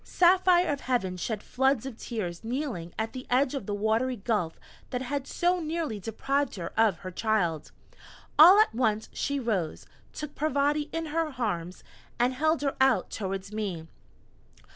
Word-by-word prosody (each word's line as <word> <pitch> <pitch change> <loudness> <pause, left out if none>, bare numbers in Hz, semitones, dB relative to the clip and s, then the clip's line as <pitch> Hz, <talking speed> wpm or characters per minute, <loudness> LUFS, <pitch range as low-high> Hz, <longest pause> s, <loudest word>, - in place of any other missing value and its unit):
Saphire 360 -2 +4
of 280 - -5
Heaven 215 -8 -1
shed 210 +4 -3
floods 265 -1 +1
of 265 -4 -6
tears 205 -7 -5
kneeling 230 - -3
at 220 0 -2
the 255 -1 -7
edge 255 +2 +2
of 275 -9 -4
the 205 - -2
watery 220 +5 +1
gulf 200 -6 -2 0.3
that 250 0 -3
had 275 +1 -3
so 355 +1 +1
nearly 315 -8 -3
deprived 275 +7 -1
her 175 -4 -6
of 220 -5 +3
her 185 - -4
child. 175 -6 0 0.7
All 355 +6 +10
at 430 - +4
once 220 -2 0
she 280 0 -1
rose, 205 -10 -2 0.3
took 300 -1 -7
Parvati 295 0 0
in 330 0 -3
her 320 -4 -1
arms, 180 -7 -3 0.3
and 245 +2 +2
held 315 +3 +1
her 275 - 0
out 265 -3 +3
towards 195 0 -4
me. 195 -7 -3
245 Hz, 165 wpm, -28 LUFS, 210-285 Hz, 0.7 s, All